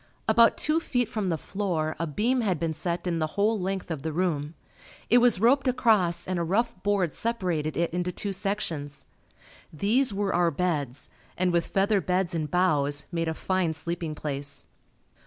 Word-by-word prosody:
About 230 0 +5
two 305 +2 +1
feet 245 -7 -1
from 205 -3 -2
the 165 - 0
floor 170 -4 -2
a 165 - -1
beam 235 - +1
had 190 -8 0
been 165 0 -1
set 170 +3 -3
in 170 -2 -1
the 155 - 0
whole 210 +2 +2
length 190 -1 -3
of 155 -4 -3
the 160 - -3
room. 155 -2 -1 0.6
It 245 - +7
was 240 -5 +4
roped 265 +5 +3
across 195 -9 +2
and 185 -1 -1
a - - 0
rough 220 +8 0
board 195 -6 +1
separated 180 -10 -2
it 170 0 0
into 180 0 -1
two 200 +2 -4
sections. 165 -8 -3 0.7
These 220 - +2
were 200 0 -1
our 175 -1 +3
beds 145 -6 -2 0.3
and 180 0 +2
with 170 -1 +1
feather 200 +1 +2
beds 180 +1 0
and 155 -3 -2
boughs, 150 -5 +1
made 165 -1 -1
a 160 - -2
fine 185 -3 0
sleeping 165 0 -4
place. 140 -2 -5
180 Hz, 180 wpm, -27 LUFS, 160-205 Hz, 0.7 s, It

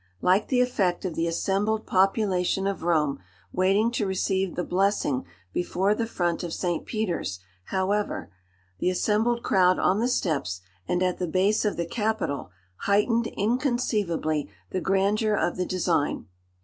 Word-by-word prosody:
Like 190 +4 +3
the 250 -2 +3
effect 195 -8 0
of 180 - -2
the 165 +1 -1
assembled 200 +6 0
population 195 -1 +2
of 195 0 -2
Rome 155 - +1 0.3
waiting 195 +5 +3
to 220 -4 -1
receive 190 -1 0
the 180 - -1
blessing 180 - 0 0.3
before 190 +3 +1
the 225 +1 -2
front 175 -5 -1
of 170 -2 -3
St. 175 -3 -2
Peter's, 180 - -2 0.3
however, 195 - -1 0.5
the - - +2
assembled 220 +5 +1
crowd 185 -1 +4
on 190 +3 +2
the 235 - +2
steps 140 - -1 0.3
and 180 +1 +1
at 180 -1 0
the 180 - -1
base 195 +6 +2
of 210 - 0
the 170 - -1
Capitol, 215 - -2 0.3
heightened 225 +3 +2
inconceivably 210 - 0 0.2
the 185 - -1
grandeur 205 +3 +2
of 175 - 0
the 180 0 -2
design. 170 -5 0
190 Hz, 150 wpm, -26 LUFS, 175-210 Hz, 0.5 s, crowd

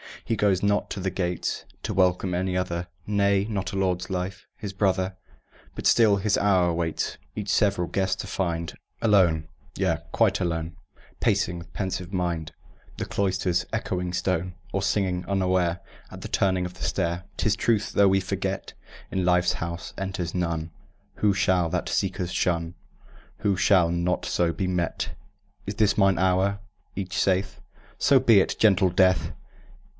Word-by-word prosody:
He 115 - 0
goes 100 -3 +2
not 105 0 +1
to 105 - -4
the 95 0 -1
gates 90 -1 -2 0.2
To - - -2
welcome 90 0 +2
any 90 +1 -1
other, 85 -1 -2 0.2
Nay, 100 -1 +2
not 100 -3 -3
Lord 95 -2 0
Life, 95 +1 -4
his 100 -2 -6
brother; 95 -1 0 0.6
But - - -6
still 110 -4 +5
his 100 +1 +1
hour 95 -3 +3
awaits 85 -1 -2 0.2
Each 105 -1 -4
several 100 -5 +2
guest 95 0 -1
to - - -8
find 85 -4 -2 0.3
Alone, 90 -8 +3 0.3
yea, - - +1
quite - - +2
alone; 80 -1 -2 0.4
Pacing 85 0 +1
with 85 -1 -13
pensive 95 -2 -3
mind 85 -4 -2 0.5
The - - -3
cloister's 95 -2 0
echoing 90 -1 -2
stone, 90 -1 -1 0.2
Or 95 - -1
singing, 95 -2 0
unaware, 95 -2 +1 0.3
At - - -10
the - - -5
turning 95 -2 +1
of 90 0 -7
the - - -8
stair 85 -1 -1
Tis 105 -2 +2
truth, 110 -1 +1
though 100 - +5
we 95 0 +3
forget, 90 - -3 0.4
In 95 - 0
Life's 90 0 +3
House 85 -2 -5
enters 90 -3 -3
none 85 -2 -2 0.4
Who 105 -2 +2
shall 95 -3 +2
that - - -2
seeker 95 -1 -1
shun, 85 -1 -1 0.7
Who 100 -2 +1
shall 90 -2 +4
not 85 +1 0
so 85 -1 +1
be 95 - -2
met. 90 -2 -1 0.6
"Is 100 - -3
this 105 -2 +3
mine 95 -2 +4
hour?" 95 +3 +2 0.4
each 95 -2 -4
saith. 95 +1 0 0.4
"So 135 -1 +5
be 115 -5 +6
it, - - +1
gentle 95 -3 +4
Death!" 95 +1 +3
95 Hz, 160 wpm, -26 LUFS, 90-100 Hz, 0.7 s, be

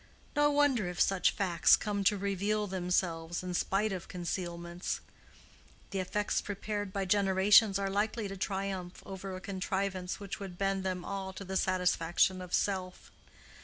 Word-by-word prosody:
No 295 0 +4
wonder 285 -9 +3
if 180 - -6
such 195 -2 +4
facts 175 -4 +4
come 205 -2 -2
to 205 +1 +4
reveal 200 +2 0
themselves 175 -3 -1
in 180 -1 -4
spite 200 +4 +1
of 185 -3 -5
concealments. 175 0 -4 0.9
The 195 - -2
effects 205 +3 0
prepared 205 0 -4
by 195 0 -2
generations 195 +1 +5
are 200 0 -1
likely 210 +2 -1
to 195 - -6
triumph 190 -2 -3
over 190 0 -6
a - - -6
contrivance 190 -1 -2
which 200 0 -6
would 190 -3 -7
bend 195 0 0
them 185 -2 -2
all 195 -1 -4
to 195 - -8
the 190 +1 -4
satisfaction 185 0 +2
of 180 -1 -8
self. 185 -2 -1
190 Hz, 155 wpm, -32 LUFS, 180-200 Hz, 0.9 s, generations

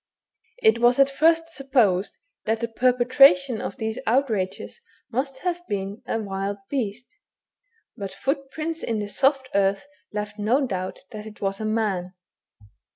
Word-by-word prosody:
It 220 +1 +5
was 240 +1 +4
at 275 0 +5
first 330 +3 +3
supposed 250 - +1 0.3
that 220 0 0
the 235 - 0
perpetration 255 +1 +4
of - - -5
these 220 +2 -3
outrages 230 - 0 0.3
must 265 +2 -2
have 350 -1 -1
been 200 +1 -4
a - - 0
wild 195 -1 -3
beast, 245 - -4 0.8
but 195 -2 -6
footprints 275 +8 -3
in 225 - -1
the 205 -1 -3
soft 270 +4 +1
earth 195 +3 +2 0.3
left 210 0 -5
no 245 +7 +2
doubt 185 -5 -4
that 215 0 -7
it 215 - -12
was 195 +1 -2
a - - -2
man. 200 -5 -1
225 Hz, 145 wpm, -24 LUFS, 205-270 Hz, 0.8 s, It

